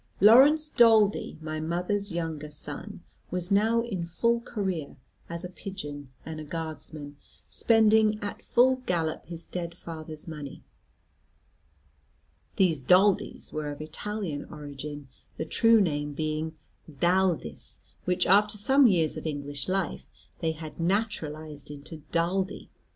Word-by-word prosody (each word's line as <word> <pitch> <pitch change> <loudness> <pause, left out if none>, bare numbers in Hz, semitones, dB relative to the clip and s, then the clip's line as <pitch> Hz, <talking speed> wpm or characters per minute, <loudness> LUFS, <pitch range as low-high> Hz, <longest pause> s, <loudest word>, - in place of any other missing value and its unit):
Laurence 275 +9 +7
Daldy, 220 -6 +4
my 155 0 -4
mother's 180 +5 -1
younger 160 -3 -3
son, 150 - -7 0.3
was 180 +1 -3
now 220 +3 +4
in 195 -7 -3
full 235 +8 +1
career, 190 - -3 0.3
as 170 +1 -5
a - - -3
pigeon 150 -7 -7 0.2
and 160 -1 -6
a - - -6
Guardsman, 155 -2 -6 0.3
spending 220 -1 +4
at 205 -1 -5
full 260 +2 +4
gallop 165 -3 -1
his 170 -1 -8
dead 170 -1 -5
father's 155 -2 -7
money. 150 -4 -8 1.9
These 165 -7 +3
Daldys 185 +6 +3
were 155 -1 -3
of 145 - -6
Italian 160 +1 -4
origin, 145 -1 -8 0.3
the 160 - -3
true 225 +4 +5
name 145 -6 0
being 155 +1 -2 0.4
D'Aldis, 170 - 0 0.3
which 180 0 +2
after 205 +2 +4
some 270 +5 +5
years 165 -7 +2
of - - -4
English 145 0 -4
life 190 -1 -2 0.3
they 160 -1 0
had 155 0 -9
naturalised 155 -6 -2
into 150 +2 -8
Daldy. 185 +3 -1
170 Hz, 125 wpm, -28 LUFS, 155-205 Hz, 1.9 s, Laurence